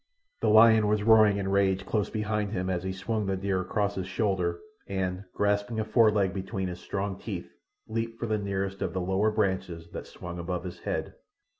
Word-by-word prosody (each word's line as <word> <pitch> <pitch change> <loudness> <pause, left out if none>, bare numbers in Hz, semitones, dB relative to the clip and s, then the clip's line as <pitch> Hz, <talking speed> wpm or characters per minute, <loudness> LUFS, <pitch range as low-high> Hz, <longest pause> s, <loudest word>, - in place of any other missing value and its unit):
The - - +1
lion 110 0 +7
was 105 0 +1
roaring 110 -2 +6
in 100 -1 -2
rage 95 -1 +2
close 105 -3 0
behind 105 -1 -2
him 95 -1 -1
as 90 -1 -1
he 95 +1 -3
swung 105 +2 -2
the 95 -1 0
deer 95 -1 0
across 100 +2 -1
his 95 -2 -4
shoulder, 95 -3 0 0.3
and, 95 0 -2
grasping 105 +2 +1
a 110 - 0
foreleg 105 -4 +3
between 95 0 -3
his 90 0 -6
strong 100 -1 -3
teeth, - - -6 0.3
leaped 115 +1 -3
for - - -2
the 110 -2 0
nearest 100 -1 -3
of - - -1
the 95 - -1
lower 95 +4 +1
branches 95 -6 -1
that - - -7
swung 90 0 -8
above 90 +1 -3
his 90 -2 -7
head. - - -3
100 Hz, 195 wpm, -28 LUFS, 95-105 Hz, 0.3 s, lion